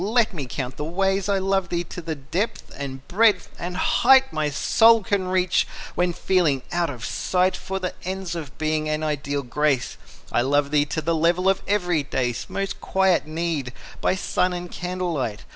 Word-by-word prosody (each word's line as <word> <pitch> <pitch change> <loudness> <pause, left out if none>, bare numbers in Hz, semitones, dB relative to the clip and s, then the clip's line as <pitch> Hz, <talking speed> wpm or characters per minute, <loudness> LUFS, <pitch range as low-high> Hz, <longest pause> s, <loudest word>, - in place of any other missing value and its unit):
Let 225 +2 +2
me 145 -7 -5
count 130 +1 -5
the - - -3
ways. 195 +4 0
I 200 - +3
love 195 -1 0
thee 175 0 -1
to 175 +1 -8
the 160 -1 -4
depth 165 +10 -3
and 135 -1 -7
breadth 205 -1 +3
and 180 +1 -4
height 265 +5 +4
My 155 -1 0
soul 225 +9 +4
can 190 -1 0
reach, 185 0 +2 0.3
when 180 0 +1
feeling 165 -7 +1
out 175 -1 0
of 125 -5 -6
sight 185 +1 +1
For 190 0 -4
the 185 -1 -3
ends 185 -1 -4
of 155 -5 -7
Being 155 0 0
and 155 0 -1
ideal 145 -2 -2
Grace. 140 +1 0 0.3
I - - +2
love 140 +2 +1
thee 145 -1 +3
to 155 +2 -3
the 165 +2 +1
level 170 +3 +2
of 195 0 +3
everyday's 150 - 0
Most 195 0 -3
quiet 190 -4 +2
need, 155 -5 -2 0.3
by - - +2
sun 185 -1 0
and 175 0 -6
candlelight. 175 - -3
175 Hz, 180 wpm, -23 LUFS, 145-190 Hz, 0.3 s, height